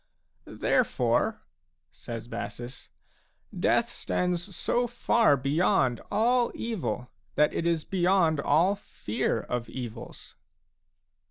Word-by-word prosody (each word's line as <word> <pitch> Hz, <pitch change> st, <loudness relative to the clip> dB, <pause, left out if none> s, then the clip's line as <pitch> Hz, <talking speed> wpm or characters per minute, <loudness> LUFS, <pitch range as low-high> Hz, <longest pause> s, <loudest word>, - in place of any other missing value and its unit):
" -, -, -44 dB
Therefore," -, -, +1 dB, 0.5 s
says 115 Hz, -1 st, -7 dB
Bassus, 120 Hz, +1 st, -7 dB, 0.3 s
" -, -, -15 dB
death -, -, +2 dB
stands 180 Hz, +1 st, -2 dB
so 240 Hz, +8 st, 0 dB
far 235 Hz, -8 st, +3 dB
beyond 140 Hz, -, +2 dB
all 235 Hz, +4 st, +2 dB
evil 205 Hz, -, -3 dB, 0.2 s
that 150 Hz, 0 st, +3 dB
it 170 Hz, -, -1 dB
is 165 Hz, -2 st, 0 dB
beyond 180 Hz, -4 st, +2 dB
all 160 Hz, +8 st, +3 dB
fear 115 Hz, -, -2 dB
of 120 Hz, 0 st, -4 dB
evils." 120 Hz, -2 st, -8 dB
165 Hz, 105 wpm, -28 LUFS, 125-195 Hz, 0.5 s, far